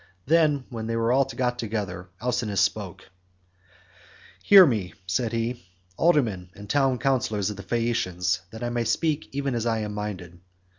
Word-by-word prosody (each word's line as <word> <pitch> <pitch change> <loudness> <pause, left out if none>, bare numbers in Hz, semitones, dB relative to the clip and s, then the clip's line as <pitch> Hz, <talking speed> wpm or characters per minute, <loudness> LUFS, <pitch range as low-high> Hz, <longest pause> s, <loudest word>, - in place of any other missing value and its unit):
Then, 150 -3 +3
when 115 -2 -5
they 115 - -2
were 120 +4 +3
got 125 -1 -1
together, 100 -5 -4
Alcinous 115 -4 -1
spoke: - - -2 1.3
"Hear 195 -2 +9
me," 105 - -1
said 110 +5 -1
he, 115 0 -2 0.3
"aldermen 115 - +1
and 105 0 -10
town 135 +1 +2
councillors 110 -7 0
of 105 - -8
the - - -6
Phaeacians, 100 -4 -1
that 110 +3 -8
I 120 - -2
may 120 -1 0
speak 155 +5 0
even 140 -1 -2
as 120 0 -1
I 115 -1 0
am 105 -1 -4
minded. 95 -4 -6
115 Hz, 155 wpm, -25 LUFS, 105-130 Hz, 1.3 s, Hear